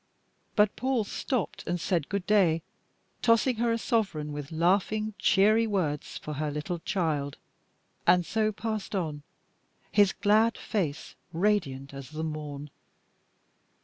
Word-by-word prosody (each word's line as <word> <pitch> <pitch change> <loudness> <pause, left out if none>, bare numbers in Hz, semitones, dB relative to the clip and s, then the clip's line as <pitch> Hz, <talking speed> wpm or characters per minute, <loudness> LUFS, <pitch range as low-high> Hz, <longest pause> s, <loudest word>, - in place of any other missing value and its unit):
But 210 -1 +4
Paul 260 -3 0
stopped 225 +1 -3
and 175 +1 -1
said 170 -3 -1
good 200 -2 -2
day, 175 -6 +3 0.6
tossing 230 +1 +3
her 235 +1 +1
a 230 - +1
sovereign 195 - -1
with 145 0 -6
laughing, 200 +6 +1
cheery 215 +3 +4
words 165 -9 -1
for 150 - -6
her 155 - 0
little 150 +4 -3
child 155 -7 -1 0.7
and 175 0 +5
so 215 +2 +1
passed 215 -1 -4
on, 155 -6 -2 0.7
his 205 -2 +5
glad 220 +2 +3
face 160 -8 -3 0.2
radiant 160 -8 0
as 135 -1 -8
the 155 +1 -5
morn. 150 -2 -5
185 Hz, 130 wpm, -28 LUFS, 155-215 Hz, 0.7 s, and